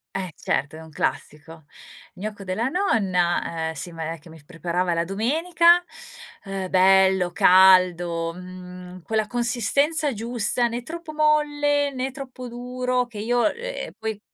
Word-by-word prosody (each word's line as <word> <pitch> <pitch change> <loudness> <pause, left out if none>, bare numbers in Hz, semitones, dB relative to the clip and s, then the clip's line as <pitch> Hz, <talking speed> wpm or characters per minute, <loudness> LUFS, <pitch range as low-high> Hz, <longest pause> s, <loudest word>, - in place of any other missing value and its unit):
Eh 185 -3 -3
certo 145 +2 -2
è 160 - -10
un 160 - -12
classico. 155 +1 -4 0.5
Gnocco 210 0 -6
della 195 +5 -2
nonna, 180 - 0
ehm, - - -5
sì 160 +4 -6
ma 165 -1 -5
è - - -9
che 165 - -17
mi 160 -2 -14
preparava 175 +2 -2
la 170 - +1
domenica, 330 - +3 0.6
ehm, 195 -1 -4
bello, 190 -1 +4
caldo, 175 -2 +4
mhmm, 180 0 -10
quella 220 -1 -1
consistenza 265 +6 +1
giusta, 235 +2 -1
né 235 +1 -4
troppo 320 +4 -8
molle 290 -1 +2
né 260 0 -3
troppo 260 -2 -8
duro 250 +1 -2
che 235 -4 -10
io, 240 +2 +1
ehm, - - -6
poi 220 -2 -4
205 Hz, 140 wpm, -23 LUFS, 180-255 Hz, 0.6 s, bello